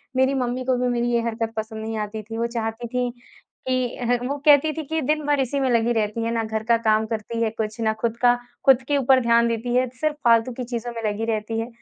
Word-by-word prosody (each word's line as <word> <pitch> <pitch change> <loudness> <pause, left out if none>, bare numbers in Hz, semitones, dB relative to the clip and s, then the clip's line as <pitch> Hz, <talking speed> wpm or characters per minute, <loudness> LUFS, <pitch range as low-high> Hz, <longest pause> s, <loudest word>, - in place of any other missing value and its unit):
मेरी 260 +1 +3
मम्मी 255 -1 -1
को 260 0 +2
भी 250 0 0
मेरी 240 -1 0
ये 235 -1 +2
हरकत 225 -1 -2
पसंद 220 0 -4
नहीं 220 0 -4
आती 215 0 -4
थी। 225 +2 -7
वो 235 +1 0
चाहती 230 0 -4
थी 250 +1 -1 0.6
कि 255 -2 0
अ, 245 - -4 0.2
वो 285 +2 -2
कहती 295 +1 +6
थी 315 - -4
कि, 320 +2 -2
"दिन 305 +2 0
भर 290 -1 +2
इसी 270 +1 0
में 265 -1 +1
लगी 235 -1 +2
रहती 220 0 -1
है, 230 - -1
ना 230 -1 0
घर 220 0 -3
का 230 +1 +3
काम 215 0 +3
करती 225 +1 -4
है 225 - +1
कुछ 220 0 -4
ना 220 -1 +2
खुद 230 0 -1
का 245 0 +4 0.3
खुद 265 -2 +6
के 290 - +2
ऊपर 265 -1 +4
ध्यान 235 0 +4
देती 235 +1 -2
है, 255 +1 +3
सिर्फ़ 310 -1 +1
फालतू 230 +1 +4
की 250 - -5
चीज़ों 240 -1 -4
में 230 - -5
लगी 215 +2 -3
रहती 225 0 -2
है।" 225 - -3
235 Hz, 260 wpm, -23 LUFS, 225-255 Hz, 0.6 s, कहती